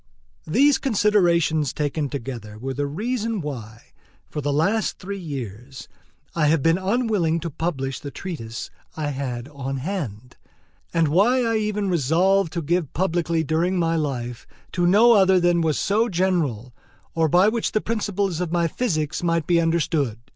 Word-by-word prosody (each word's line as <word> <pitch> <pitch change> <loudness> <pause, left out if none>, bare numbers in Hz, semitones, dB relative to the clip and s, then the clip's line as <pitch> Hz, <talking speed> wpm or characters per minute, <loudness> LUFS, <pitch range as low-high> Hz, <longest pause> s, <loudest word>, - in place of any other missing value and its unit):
These 275 - +4
considerations 175 - +2
taken 145 0 -2
together 115 -6 -6
were 135 +4 -4
the 145 +1 -2
reason 225 - -2
why, 120 - -7 0.4
for 150 - -5
the 145 0 -1
last 195 +9 +1
three 200 +2 -6
years, 130 - -7 0.5
I 155 -3 +2
have 150 -2 +2
been 165 +2 +3
unwilling 195 -5 +1
to 170 0 -4
publish 135 -4 -3
the 145 - -7
treatise 140 -10 -6 0.3
I 150 -2 -1
had 130 -3 -4
on 135 -2 -5
hand, 130 - -5 0.5
and 165 -2 +2
why 230 - +3
I 230 -1 +1
even 210 -1 -1
resolved 175 +3 +2
to 170 -2 -2
give 170 0 -1
publicity 170 -2 0
during 165 +4 0
my 165 -1 +1
life 125 -6 -3 0.2
to 175 -1 +1
no 215 +6 +6
other 190 -4 +5
that 175 -1 +3
was 160 -2 +1
so 220 +4 +1
general, 165 - -1 0.4
or 160 -1 +2
by 180 +6 +5
which 230 +1 0
the 215 - +3
principles 205 -5 -2
of 175 -2 -2
my 170 -1 +2
physics 155 - -2
might 165 -2 0
be 170 -1 +3
understood. 160 -7 0
165 Hz, 160 wpm, -23 LUFS, 140-190 Hz, 0.5 s, no